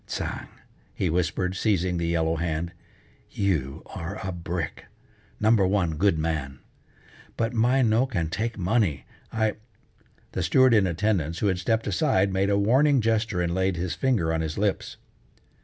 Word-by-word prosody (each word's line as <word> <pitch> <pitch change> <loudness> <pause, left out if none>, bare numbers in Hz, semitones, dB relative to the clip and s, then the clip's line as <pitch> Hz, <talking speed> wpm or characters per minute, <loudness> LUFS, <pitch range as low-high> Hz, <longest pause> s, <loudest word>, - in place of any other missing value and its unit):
"Tsang!" - - -4 0.5
he 90 - 0
whispered, 90 +2 -1
seizing 95 -3 +1
the 85 - -1
yellow 80 -1 +1
hand, 85 +1 -2 0.6
"You 80 -7 -1
are 95 +2 -5
a - - -2
brick! 85 -2 -5 0.5
Number 110 -3 +4
one 95 -4 +1
good 95 0 +3
man. 75 -4 -2 0.8
But 115 +1 -1
my 125 +3 +3
no 115 +3 +3
can 85 -11 -2
take 115 +3 -2
money, 95 - 0 0.3
I 110 -1 0 0.4
" - - -35
The 95 - -2
steward 130 +9 +4
in 105 -4 +4
attendance, 85 -3 0
who - - -1
had 95 -1 -1
stepped 115 +4 0
aside, 95 +1 +1
made 95 +1 +1
a 100 - +2
warning 130 +7 +4
gesture 110 -4 0
and 85 0 -1
laid 95 0 +1
his 90 +1 -2
finger 105 -12 +1
on 80 - 0
his 80 -1 -4
lips. 100 -1 -1
95 Hz, 160 wpm, -25 LUFS, 85-110 Hz, 0.8 s, Number